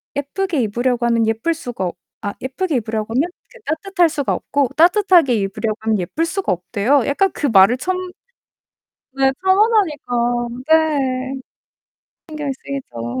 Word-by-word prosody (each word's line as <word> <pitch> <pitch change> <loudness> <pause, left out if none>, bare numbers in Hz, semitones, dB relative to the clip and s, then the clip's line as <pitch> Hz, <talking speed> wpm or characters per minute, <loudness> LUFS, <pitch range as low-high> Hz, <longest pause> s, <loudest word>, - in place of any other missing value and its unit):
예쁘게 300 +3 -1
입으려고 240 +3 0
하면 230 -1 +2
예쁠 225 +9 0
수가 245 -11 -5
어 - - -3 0.3
아 205 - -3
예쁘게 280 +4 -2
입으려고 220 -1 -3
하면 285 +8 +1 0.2
그 - - -15
따뜻할 355 0 +1
수가 290 -3 -1
없고 280 -3 0
따뜻하게 345 - +4
입으려고 210 +2 -2
하면 220 -2 0
예쁠 295 - -1
수가 370 - -2
없대요. 215 +9 +1
약간 385 +8 +2
그 - - -3
말을 220 +1 +5
처음 370 +8 -2 1.2
네 270 0 +3
편안하니까. 300 - +2 0.2
네. 275 -5 +2 1.0
신경이 300 -2 -4
쓰이죠. 120 - -5
270 Hz, 315 characters per minute, -19 LUFS, 225-325 Hz, 1.2 s, 말을